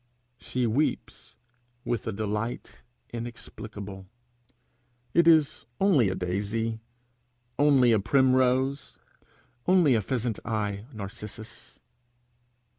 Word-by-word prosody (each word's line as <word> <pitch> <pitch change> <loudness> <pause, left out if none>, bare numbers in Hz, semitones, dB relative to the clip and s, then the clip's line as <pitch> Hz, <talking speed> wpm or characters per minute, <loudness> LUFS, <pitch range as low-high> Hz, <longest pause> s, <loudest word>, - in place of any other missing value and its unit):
She 125 -1 -2
weeps 125 +7 -2 0.5
with 120 -3 -2
a - - 0
delight 105 +3 -4 0.3
inexplicable. 105 -4 -8 1.1
It 170 -1 +4
is 155 -3 +4
only 160 - +4
a 95 - -2
daisy! 105 +5 -2 0.8
only 140 -4 +5
a 110 - +4
primrose! 130 +3 +2 0.7
only 180 -7 +5
a 110 - +2
pheasant 120 0 -2
eye 105 -1 -3
narcissus! 110 0 -9
115 Hz, 90 wpm, -27 LUFS, 105-130 Hz, 1.1 s, only